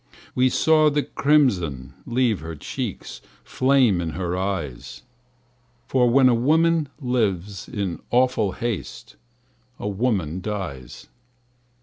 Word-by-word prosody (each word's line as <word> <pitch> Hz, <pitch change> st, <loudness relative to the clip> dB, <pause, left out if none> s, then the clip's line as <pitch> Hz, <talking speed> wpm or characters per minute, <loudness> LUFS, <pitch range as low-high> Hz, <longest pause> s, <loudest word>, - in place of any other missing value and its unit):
We 130 Hz, +1 st, +3 dB
saw 155 Hz, +2 st, +4 dB
the 145 Hz, 0 st, 0 dB
crimson 90 Hz, -, +1 dB
leave 120 Hz, -4 st, +1 dB
her 80 Hz, 0 st, -7 dB
cheeks 75 Hz, -, -6 dB, 0.2 s
Flame 130 Hz, -8 st, +2 dB
in 85 Hz, -, -3 dB
her 90 Hz, 0 st, -3 dB
eyes; 90 Hz, -10 st, -4 dB, 0.8 s
For 125 Hz, -2 st, +2 dB
when 130 Hz, +2 st, +5 dB
a 125 Hz, -, +4 dB
woman 160 Hz, +5 st, +2 dB
lives 105 Hz, -, -2 dB
in 100 Hz, -5 st, -3 dB
awful 120 Hz, -6 st, +2 dB
haste 115 Hz, -4 st, -5 dB, 0.6 s
A -, -, -5 dB
woman 95 Hz, -6 st, -1 dB
dies. 90 Hz, -, -6 dB
110 Hz, 110 wpm, -23 LUFS, 90-130 Hz, 0.8 s, when